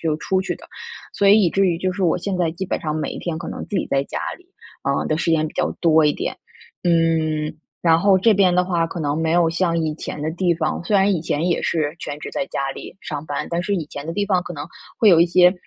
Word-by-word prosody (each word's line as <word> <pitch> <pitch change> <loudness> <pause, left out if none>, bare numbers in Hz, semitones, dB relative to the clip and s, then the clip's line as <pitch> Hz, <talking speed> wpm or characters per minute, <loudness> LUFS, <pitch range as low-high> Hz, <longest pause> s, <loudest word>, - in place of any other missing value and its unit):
就 160 -2 0
出 190 +2 0
去 190 - -3
的， - - -14 0.5
所 200 - +2
以 210 +1 +7
以 175 - +3
至 195 +2 +2
于 175 -2 +1
就 185 0 -1
是 195 0 -1
我 165 - +3
现 185 +1 -3
在 175 -2 +2
基 190 +3 -4
本 - - -2
上 155 -1 -2
每 155 -1 -2
一 - - -6
天 170 -3 -3
可 - - -6
能 - - -6
自 - - -31
己 - - -1
在 135 0 +1
家 - - -5 0.2
里， 360 - -23 0.4
啊， - - 0
的 155 - 0
时 165 - +1
间 155 -1 +2
比 - - -13
较 - - 0
多 160 -2 +5
一 145 - +3
点。 - - -4 0.5
嗯， 160 -2 +1 0.3
然 165 -1 +5
后 195 +1 +4
这 220 +4 +4
边 190 -3 +3
的 180 0 +3
话 170 -2 0
可 170 +1 -6
能 145 0 -1
没 160 0 +1
有 170 -1 +3
像 170 0 0
以 160 -2 0
前 150 - -6
的 155 - -1
地 175 +1 +1
方， 165 - -2
虽 205 +3 +2
然 195 +1 +4
以 170 - 0
前 155 -1 -1
也 170 - +1
是 155 -1 -1
全 145 - -5
职 - - -6
在 185 - -2
家 135 -5 -2
里 - - -9
上 150 -1 -6
班， 145 0 -3
但 170 0 0
是 200 +3 -1
以 165 -5 -2
前 145 0 -8
的 165 - -3
地 205 +2 0
方 185 -3 +2
可 175 - -7
能 145 -1 -5 0.3
会 220 - +4
有 170 -3 +7
一 170 - +6
些 180 +1 +5
170 Hz, 305 characters per minute, -21 LUFS, 155-185 Hz, 0.5 s, 以